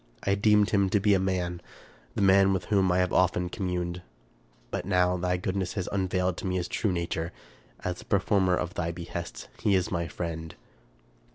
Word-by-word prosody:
I 100 Hz, -, +2 dB
deemed 105 Hz, +1 st, +4 dB
him 100 Hz, -2 st, +3 dB
to 105 Hz, -, +3 dB
be 100 Hz, +1 st, +3 dB
a 95 Hz, -, +4 dB
man, 90 Hz, -2 st, -1 dB, 0.3 s
— -, -, -28 dB
the -, -, +1 dB
man 95 Hz, 0 st, +5 dB
with 90 Hz, -2 st, -2 dB
whom 95 Hz, -2 st, +4 dB
I 90 Hz, -, +2 dB
have 90 Hz, -1 st, +1 dB
often 90 Hz, -1 st, +2 dB
communed; 90 Hz, -2 st, -3 dB, 0.7 s
but -, -, -2 dB
now 90 Hz, -1 st, +2 dB
thy 90 Hz, 0 st, 0 dB
goodness 95 Hz, 0 st, -2 dB
has 95 Hz, -3 st, -3 dB
unveiled 90 Hz, -2 st, 0 dB
to -, -, -4 dB
me 90 Hz, -, -1 dB
his 90 Hz, -1 st, -1 dB
true 105 Hz, -, 0 dB
nature. 85 Hz, -1 st, -2 dB, 0.5 s
As 90 Hz, -1 st, -3 dB
the -, -, -11 dB
performer 95 Hz, -2 st, +2 dB
of 90 Hz, 0 st, -3 dB
thy 85 Hz, -1 st, -2 dB
behests, 85 Hz, 0 st, -6 dB
he 100 Hz, -, +3 dB
is 95 Hz, -1 st, 0 dB
my 85 Hz, -2 st, -1 dB
friend." 80 Hz, 0 st, -5 dB
90 Hz, 195 wpm, -28 LUFS, 90-95 Hz, 0.7 s, man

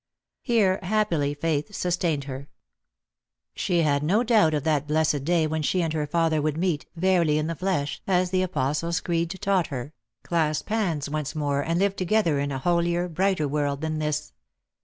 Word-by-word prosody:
Here 205 Hz, -6 st, +2 dB
happily 180 Hz, -8 st, 0 dB
faith 160 Hz, +5 st, -2 dB
sustained 170 Hz, -5 st, 0 dB
her. 135 Hz, +1 st, -7 dB, 1.0 s
She 175 Hz, -2 st, +1 dB
had 140 Hz, -2 st, +2 dB
no 195 Hz, +10 st, +2 dB
doubt 215 Hz, -10 st, +4 dB
of 145 Hz, -, -1 dB
that 150 Hz, -2 st, 0 dB
blessed 150 Hz, -2 st, +1 dB
day 170 Hz, -1 st, +2 dB
when 155 Hz, 0 st, -1 dB
she 180 Hz, +4 st, +1 dB
and 160 Hz, -1 st, -1 dB
her 150 Hz, -2 st, -1 dB
father 160 Hz, 0 st, +1 dB
would 155 Hz, 0 st, -1 dB
meet, 170 Hz, -4 st, -1 dB
verily 170 Hz, -3 st, +2 dB
in 155 Hz, -, 0 dB
the 165 Hz, -, -2 dB
flesh, 155 Hz, -5 st, -2 dB
as 180 Hz, -1 st, +2 dB
the 185 Hz, -1 st, +2 dB
Apostles' 165 Hz, -1 st, -1 dB
Creed 170 Hz, -1 st, -1 dB
taught 190 Hz, -3 st, +2 dB
her, 135 Hz, +2 st, -6 dB, 0.3 s
clasp 155 Hz, -2 st, -1 dB
hands 180 Hz, -10 st, 0 dB
once 150 Hz, 0 st, -3 dB
more, 145 Hz, -2 st, 0 dB
and 165 Hz, +3 st, -1 dB
live 195 Hz, +1 st, +1 dB
together 185 Hz, -5 st, +1 dB
in 140 Hz, 0 st, -1 dB
a 135 Hz, -, -2 dB
holier, 175 Hz, +3 st, +1 dB
brighter 180 Hz, -2 st, 0 dB
world 145 Hz, -1 st, -1 dB
than 155 Hz, -1 st, -2 dB
this. 150 Hz, -1 st, -2 dB
160 Hz, 180 wpm, -25 LUFS, 150-180 Hz, 1.0 s, doubt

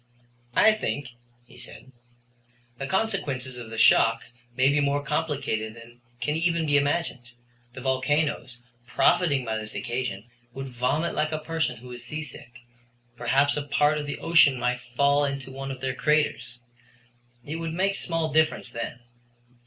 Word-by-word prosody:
"I 220 Hz, -, +6 dB
think," 145 Hz, -, -3 dB, 0.4 s
he -, -, -18 dB
said, 130 Hz, -, -11 dB, 0.9 s
"the 135 Hz, -, -3 dB
consequences 140 Hz, -, -1 dB
of 120 Hz, -2 st, -8 dB
the 115 Hz, -, -7 dB
shock 115 Hz, 0 st, +5 dB, 0.3 s
may 130 Hz, +1 st, +4 dB
be 140 Hz, +1 st, +3 dB
more 145 Hz, 0 st, +1 dB
complicated 140 Hz, -8 st, -2 dB
than 120 Hz, +1 st, -14 dB, 0.2 s
can 150 Hz, +4 st, -1 dB
even 165 Hz, 0 st, +1 dB
be 145 Hz, -1 st, +2 dB
imagined. 145 Hz, -3 st, 0 dB, 0.5 s
The 130 Hz, -, -7 dB
volcanoes, 130 Hz, 0 st, 0 dB, 0.3 s
profiting 140 Hz, -5 st, +3 dB
by 110 Hz, -1 st, -2 dB
this 110 Hz, 0 st, -8 dB
occasion, 120 Hz, -4 st, -3 dB, 0.3 s
would 135 Hz, 0 st, -5 dB
vomit 130 Hz, +7 st, 0 dB
like 155 Hz, +1 st, 0 dB
a 155 Hz, -, -1 dB
person 155 Hz, -5 st, -2 dB
who 125 Hz, +2 st, -11 dB
is 120 Hz, 0 st, -9 dB
seasick. 150 Hz, -4 st, -7 dB, 0.7 s
Perhaps 135 Hz, +4 st, +2 dB
a -, -, 0 dB
part 145 Hz, +1 st, +2 dB
of 145 Hz, -, -5 dB
the 145 Hz, -, -3 dB
ocean 155 Hz, -5 st, +5 dB
might 125 Hz, +1 st, 0 dB
fall 140 Hz, +2 st, +4 dB
into 140 Hz, -1 st, -3 dB
one 135 Hz, +1 st, -6 dB
of 130 Hz, -1 st, -6 dB
their 130 Hz, -1 st, -1 dB
craters. 140 Hz, -4 st, 0 dB, 0.9 s
It 150 Hz, +3 st, -4 dB
would 165 Hz, -1 st, -4 dB
make 195 Hz, +2 st, +1 dB
small 165 Hz, -5 st, -1 dB
difference 155 Hz, -5 st, +2 dB
then. 120 Hz, +1 st, -5 dB
140 Hz, 155 wpm, -26 LUFS, 125-155 Hz, 0.9 s, I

